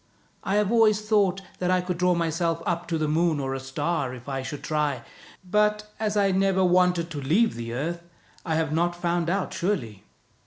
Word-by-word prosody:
I 195 - 0
have 210 0 +2
always 220 -3 +4
thought 200 -3 +2 0.2
that 180 - 0
I 185 0 +3
could 180 -1 -3
draw 180 0 +3
myself 165 0 -1
up 175 0 -2
to 165 - -1
the 155 -1 0
moon 160 0 +1
or 135 -1 -2
a 135 - -3
star, 135 0 -2
if 125 +1 -13
I 135 -1 -2
should 145 +2 -6
try; 150 -5 -1 0.4
but 210 +2 +1
as 215 -1 -1
I 200 -1 +3
never 190 0 +2
wanted 180 -1 +2
to 145 -3 -4
leave 195 +12 +2
the 115 0 -6
earth, 165 +7 -3 0.4
I 160 -3 -1
have 160 -1 0
not 175 +2 +1
found 170 -1 0
out 195 +1 -1
surely." 140 - -2
170 Hz, 200 wpm, -25 LUFS, 150-190 Hz, 0.4 s, always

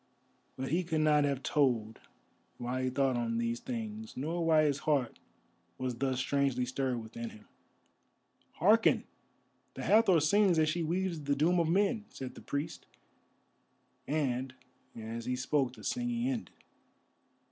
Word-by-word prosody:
But 130 +1 -3
he 175 +4 +1
could 160 -2 0
not 150 -1 +4
have 140 -2 -1
told 120 -7 +1 0.6
why 125 +1 -2
he - - +1
thought 135 0 +1
on 115 -1 -1
these 115 0 -1
things, 225 -2 -6
nor 165 +6 -2
why 160 -1 +4
his 145 -2 +1
heart 140 -6 0 0.6
was 130 -1 -2
thus 130 -2 0
strangely 130 -1 +1
stirred 130 -2 -2
within 115 +1 -6
him. 105 - -15 1.1
"Hearken! 215 +7 +4 0.7
the - - -5
Hathor 210 -5 +5
sings 180 +4 +4
as 155 -1 +3
she 170 +2 -1
weaves 170 0 -1
the 145 0 0
doom 170 +5 +3
of 165 -1 +1
men," 205 +4 +2
said 130 -2 -7
the - - -12
priest, 145 +3 -4 1.2
and 130 -3 -1 0.4
as 115 +1 -6
he 125 0 -1
spoke 130 0 0
the 110 -4 -13
singing 245 0 -1
ended. 255 -4 -2
145 Hz, 145 wpm, -32 LUFS, 125-175 Hz, 1.2 s, Hathor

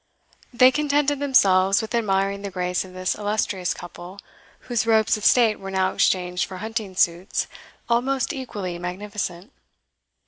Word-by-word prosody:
They 255 +1 +6
contented 290 0 +1
themselves 195 -9 +4
with 220 0 -5
admiring 200 -3 0
the 200 - -5
grace 180 -1 -2
of 185 -1 -13
this 185 0 -1
illustrious 205 -3 -2
couple, 175 +2 -10 0.4
whose 235 -2 -2
robes 220 -1 +3
of 215 - -7
state 230 -3 +4
were 195 - -7
now 190 0 0
exchanged 180 -1 +1
for 190 - -9
hunting 215 -2 -5
suits, 175 +2 +1 0.4
almost 255 +2 0
equally 205 -10 -5
magnificent. 185 +2 -5
200 Hz, 140 wpm, -23 LUFS, 185-235 Hz, 0.4 s, They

